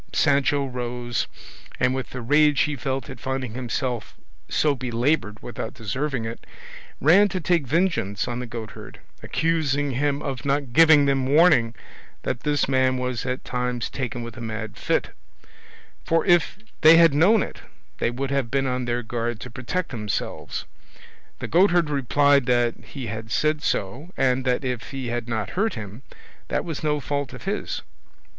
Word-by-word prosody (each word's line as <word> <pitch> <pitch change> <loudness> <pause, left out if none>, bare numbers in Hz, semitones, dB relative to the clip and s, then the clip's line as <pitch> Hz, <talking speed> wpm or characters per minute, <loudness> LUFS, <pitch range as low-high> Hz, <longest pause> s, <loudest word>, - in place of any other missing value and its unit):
Sancho 140 0 +2
rose, 120 -1 -3 0.5
and 125 - +3
with 130 -1 -4
the 125 - -6
rage 145 +1 +4
he 150 +2 +1
felt 135 +1 -3
at 135 -4 -9
finding 130 -3 -3
himself 125 -2 -3 0.3
so 150 -2 +2
belaboured 125 -2 0
without 115 -1 -6
deserving 125 +3 -3
it, 115 +1 -6 0.6
ran 180 +9 +6
to 190 -2 -3
take 170 -4 +1
vengeance 150 - 0
on 120 0 -3
the 125 - -5
goatherd, 115 -3 -8 0.2
accusing 145 -4 0
him 140 +2 0
of 135 -1 -4
not 140 -3 -1
giving 160 -2 +7
them 135 -2 +1
warning 140 -6 +4 0.5
that 120 - -2
this 145 0 0
man 130 -1 +2
was 125 0 -3
at 125 +1 -3
times 125 -1 -2
taken 125 -2 -4
with 115 -1 -8
a 120 - -9
mad 110 -1 -5
fit, - - 0 0.9
for 165 0 +1
if 175 -2 +3 0.2
they 160 +1 +9
had 165 -3 +6
known 190 +9 +5
it - - -8 0.4
they - - +1
would 135 +3 -3
have 135 -4 0
been 135 +1 +1
on 125 -1 -1
their 120 0 -1
guard 120 0 -3
to 125 +3 -8
protect 130 +10 -3
themselves. 105 -5 -4 0.7
The - - -5
goatherd 175 -2 +3
replied 140 0 +3
that 120 -1 +3
he 135 -4 -7
had 110 +1 -6
said 150 +5 +1
so, 125 - -2
and 130 -1 +2
that 125 +1 +1
if 125 -2 -3
he 135 -3 -4
had 120 0 -3
not 110 -3 -2
heard 205 +3 0
him, 110 +1 -8 0.5
that - - -1
was 165 -4 -4
no 150 -1 +1
fault 145 -1 -3
of - - -10
his. 200 +2 -3
130 Hz, 165 wpm, -24 LUFS, 120-150 Hz, 0.9 s, they